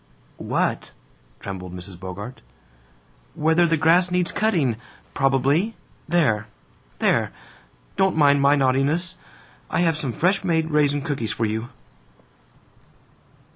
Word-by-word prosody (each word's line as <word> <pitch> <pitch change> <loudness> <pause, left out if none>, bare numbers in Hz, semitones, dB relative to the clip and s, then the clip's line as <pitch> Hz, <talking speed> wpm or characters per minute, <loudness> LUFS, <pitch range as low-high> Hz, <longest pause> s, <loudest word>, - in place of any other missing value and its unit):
"What?" - - -2 0.5
trembled 90 -2 -7
Mrs. 90 0 -10
Bogart. 100 +7 -8 0.9
"Whether 160 +3 +3
the 165 0 +2
grass 170 +4 +4
needs 180 -1 0
cutting, 160 - +1 0.4
probably! 140 - +1 0.3
There, 140 -11 +1 0.5
there! - - +1 0.7
Don't 190 -3 +2
mind 145 -2 +5
my 140 +1 +5
naughtiness. 140 +6 +1 0.5
I - - 0
have 165 -3 +2
some 140 -5 -1
fresh 180 - +1
made 160 -3 0
raisin 145 -1 +2
cookies 140 -8 -2
for 115 - -1
you." 110 +3 -3
145 Hz, 110 wpm, -23 LUFS, 120-170 Hz, 0.9 s, mind